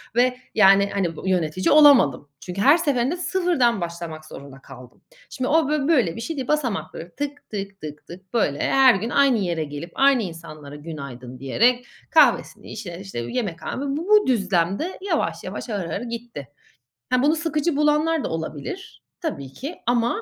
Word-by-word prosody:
ve 250 +1 +2 0.2
yani 200 -1 +5
hani 175 -5 -1
b 190 - -4
yönetici 180 0 0
olamadım. 255 - +5
Çünkü 180 +2 -5
her 285 +9 +6
seferinde 285 0 0
sıfırdan 340 - +1
başlamak 170 -2 -6
zorunda 140 -2 -11
kaldım. 125 -2 -14 0.3
Şimdi 255 -2 -3
o 310 -2 +2
bo 300 -1 0
böyle 245 - +2
bir 230 - -6
şey 320 +7 -4
değil. 260 - -4
Basamakları 240 - -2
tık 290 0 -5
tık 200 -1 -6
tık 150 -1 -9
tık, 185 +2 -13
böyle, 175 -12 +1
her 265 -4 +5
gün 225 +5 -3
aynı 275 -2 +3
yere 170 -5 -1
gelip 145 +3 -7
aynı 270 -4 +4
insanlara 155 -4 -9
"günaydın" 140 -5 -9
diyerek 240 - +2 0.3
kahvesini - - +3
içerek, 190 -3 -7
işte, 190 -11 -6
yemekhane 195 - -4 0.2
bu 335 +5 -5
bu 425 0 +5
düzlemde 195 - 0
yavaş 395 - -2
yavaş, - - -6
ağır 200 -6 -3
ağır 200 - -3
gitti. 235 - -7 0.6
He, 255 +1 +2
bunu 305 +3 +3
sıkıcı 315 -1 -1
bulanlar 300 +1 +2
da - - -3
olabilir 160 - -6 0.2
tabii 140 - -5
ki 285 - -7
ama 240 - +1
215 Hz, 165 wpm, -23 LUFS, -, 0.6 s, her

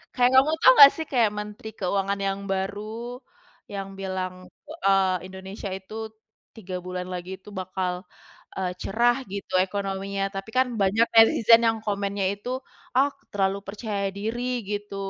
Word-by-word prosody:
kayak 245 0 +4
kamu 270 +4 +6
tahu 260 - +9
nggak 280 -1 +12
sih, 320 - -4
kayak 235 -5 +3
Menteri 210 +2 -7
Keuangan 195 +1 -1
yang 195 0 -2
baru 215 +5 -4 0.5
yang 195 -1 -5
bilang, 185 -1 -3
e 300 - -17 0.2
eee, 195 -1 +4
Indonesia 190 +2 -7
itu 190 +2 -9 0.6
3 190 -5 -7
bulan 180 0 -4
lagi 180 0 -6
itu 210 - -13
bakal, 185 -1 -3 0.6
eee, 185 -1 -2
cerah 240 +5 +2
gitu 200 -1 -6
ekonominya, 195 0 -3
tapi 195 +2 -5
kan 260 0 +4
banyak 210 +4 +3
netizen 225 0 +7
yang 225 0 +2
komennya 200 -1 -1
itu, 205 +4 -8 0.5
"Ah 270 +3 +4 0.2
terlalu 195 -1 +1
percaya 200 -1 -3
diri," 225 +4 -3 0.3
gitu, 205 -1 -4
200 Hz, 145 wpm, -25 LUFS, 190-225 Hz, 0.6 s, nggak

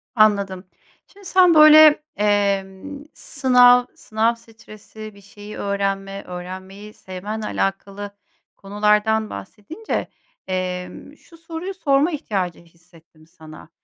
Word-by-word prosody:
Anladım. 200 -4 +2 0.4
Şimdi 400 0 -19
sen 365 -2 +4
böyle, 305 -1 +7
emm, 205 +6 -1
sınav, 250 -3 +4
sınav 225 +2 -1
stresi, 220 -1 -13
bir 200 - -18
şeyi 205 +1 -12
öğrenme, 195 0 -3
öğrenmeyi 190 +3 -9
sevmenle 205 +4 -7
alakalı 200 0 -4 0.5
konulardan 210 +2 0
bahsedince, 305 - -6 0.4
emm, 185 +8 -5
şu 335 - -20
soruyu 330 +3 -7
sorma 295 -3 +1
ihtiyacı 195 - -4
hissettim 165 -1 -23
sana. 160 -2 -15
210 Hz, 100 wpm, -21 LUFS, 190-250 Hz, 0.5 s, böyle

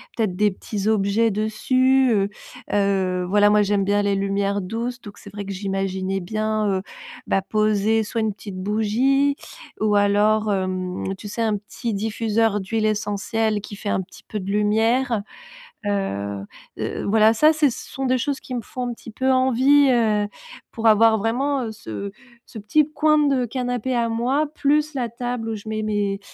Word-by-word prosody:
peut-être, 205 -6 -1
des 210 -1 +3
petits 200 +2 -5
objets 220 +1 +2
dessus. 255 +5 +2
Heu 200 -1 +1 0.4
heu, 190 -3 +1
voilà, 205 +2 +4
moi, 210 0 +4
j'aime 205 -1 +1
bien 205 +1 +1
les 200 -1 +1
lumières 200 +1 0
douces. 235 +6 -4
Donc 205 -2 -11
c'est 205 - -12
vrai 205 0 -5
que 195 - -6
j'imaginais 195 0 -2
bien, 215 +3 -1
heu, 185 - -3 0.5
bah, 195 - +2
poser 215 +2 +1
soit 225 +2 -3
une 220 -1 0
petite 200 -1 -9
bougie 225 +8 +1 0.5
ou 210 -1 +2
alors, 205 +1 +3
hem, 185 0 -2
tu 205 - -9
sais, 210 +3 -4
un 220 -2 +1
petit 220 +2 -5
diffuseur 220 0 0
d'huiles 215 +3 -1
essentielles 215 +1 0
qui 205 0 -9
fait 205 +1 -5
un 190 - +1
petit 185 - -14
peu 215 - -5
de 195 0 -6
lumière. 220 +3 +1 0.6
Heu 100 - -2 0.3
heu, - - -3
voilà, 220 +1 +4
ça, 305 +7 +5
c'est 310 -2 +3
ce 235 - -8
sont 270 0 -3
des 255 0 +2
choses 270 +2 -2
qui 255 - -7
me 240 - -2
font 245 +3 -5
un 240 - -3
petit 230 - -11
peu 260 +4 0
envie, 265 +2 +4
heu, 215 -4 +2 0.4
pour 225 0 -1
avoir 220 +1 +6
vraiment, 255 +6 0
heu, 225 - -4
ce 215 - -13 0.6
ce 225 - -10
petit 280 +9 +2
coin 305 +1 +3
de 275 -4 +2
canapé 245 +1 -2
à 235 -1 +1
moi, 250 +6 +1
plus 300 +1 +1
la 245 -3 -2
table 235 0 -4
où 220 - -2
je 210 +1 -10
mets 215 0 -2
mes 205 -2 -1
215 Hz, 180 wpm, -22 LUFS, 200-240 Hz, 0.6 s, avoir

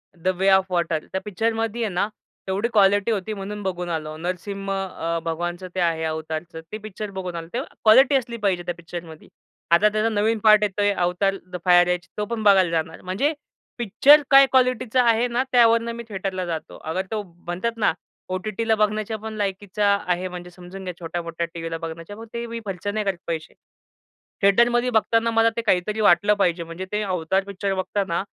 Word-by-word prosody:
The 185 +2 -1
Way 195 +1 +4
of 190 - -1
Water. 170 -2 +1
त्या 190 - -2
पिक्चरमध्ये 225 +2 -1
आहे 220 - 0
ना, 190 +3 +1 0.4
तेवढी 195 +4 0
क्वालिटी 205 +1 +4
होती 215 0 -2
म्हणून 205 +1 -6
बघून 180 -2 -3
आलो. 155 -2 -3
नरसिंह 190 +4 -4
अ, 185 -4 -2
भगवानचं 175 +2 -3
ते - - -1
आहे, 165 -2 +1
Avatarचं. 160 +1 -4
ती 215 - -4
पिक्चर 215 -1 -7
बघून 185 -2 -5
आलो. 165 -1 -6
तेव्हा 255 +3 -4
क्वालिटी 260 +6 +6
असली 235 -3 -1
पाहिजे 180 -3 +1
त्या 175 0 -3
पिक्चरमध्ये. 170 -1 -9 0.4
आता 200 +5 +6
त्याचा 215 +2 0
नवीन 220 +1 +1
पार्ट 215 -1 +7
येतोय 205 0 +1
Avatar, 185 +2 0
द 180 - -3
फायर 175 0 +6
ऐश 175 0 -6
तो 210 - -1
पण 220 0 -4
बघायला 195 -3 +5
जाणार. 160 0 -2
म्हणजे 210 +12 0 0.4
पिक्चर 265 +6 +6
काय 275 0 +9
क्वालिटीचा 255 -1 +3
आहे 230 +2 +3
ना 245 +2 0
त्यावरून 230 -1 +4
मी 235 - -6
थेटरला 190 -2 -3
जातो. 165 -2 -5
अगर 180 +4 -3
तो 220 -1 -1 0.2
म्हणतात 185 +7 -3
ना 210 -7 +2 0.4
ओ-टी-टीला 215 +4 -1
बघण्याच्या 215 +1 0
पण 220 +1 -6
लायकीचा 200 0 -2 0.2
आहे 180 +1 0
म्हणजे 180 -1 -8
समजून 180 +2 -11
घ्या 180 -1 -5
छोट्या-मोठ्या 170 0 -4
टीव्हीला 165 -1 -4
बघण्याच्या, 165 +4 -7
मग 225 - -9
ते 235 0 -3
मी 230 0 -5
खर्च 195 0 -5
नाही 210 +1 -1
करत 195 -2 0
पैसे. 160 -2 -4 0.9
थिएटरमध्ये 235 +5 +4
बघताना 225 0 +2
मला 225 0 +4
ते - - +1
काहीतरी 210 0 0
वाटलं 205 +1 +5
पाहिजे 170 -2 +1
म्हणजे 165 +3 -7
ते 210 0 0
अवतार 185 0 0
पिक्चर 200 0 -3
बघताना 190 -1 -1
195 Hz, 185 wpm, -23 LUFS, 175-220 Hz, 0.9 s, काय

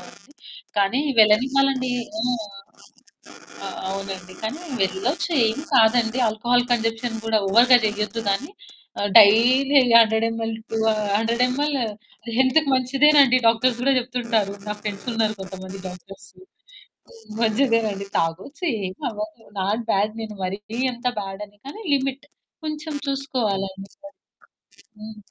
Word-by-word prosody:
అవునండి. 290 - -16 0.4
కానీ 205 +6 +2 0.2
వెళ్ళనివ్వాలండి. 255 +4 +3 0.3
హ్మ్. 245 +2 0 1.3
అ - - -3 0.2
అవునండి. 190 -2 -6
కానీ 230 +10 -4 0.2
వెళ్ళొచ్చు 215 - -1 0.2
ఏమి 225 +7 -3
కాదండి 230 0 +3
ఆల్కహాల్ 240 +3 +1
కన్సంప్షన్ 225 0 -1
కూడా 225 -1 +2
ఓవర్‌గా 240 +5 +6
చేయొద్దు 210 +2 -2
కానీ 225 +10 -1 0.7
డైలీ 245 +7 +6 0.2
100 220 0 +3
ఎంఎల్ 225 0 -3 0.2
టూ 225 - -1 0.4
100 230 +3 +1
ఎంఎల్ 285 +3 -1 0.6
హెల్త్‌కి 265 +3 +3
మంచిదేనండి 270 0 +4
డాక్టర్స్ 235 +1 +2
కూడా 275 +1 +3
చెప్తుంటారు. 235 -5 -2
నా 210 - -2
ఫ్రెండ్స్ 205 +1 -6
ఉన్నారు 220 -1 0
కొంతమంది 190 0 -8
డాక్టర్స్ 185 +2 -13 1.1
మంచిదేనండి 225 -3 +1
తాగొచ్చు, 185 - -3 0.2
ఏమవ్వదు. 215 +3 -6
నాట్ 205 +5 -1
బ్యాడ్ 205 +2 +1
నేను 215 -1 -7
మరీ 190 +2 -3 0.3
అంత 240 +1 -4
బ్యాడని 200 +1 -8
కానీ 420 +11 -9
లిమిట్ 275 0 -1 0.4
కొంచెం 305 0 -5
చూసుకోవాలండి. 200 -8 -3 1.1
హ్మ్. 215 0 -10
225 Hz, 110 wpm, -22 LUFS, 210-255 Hz, 1.3 s, ఓవర్‌గా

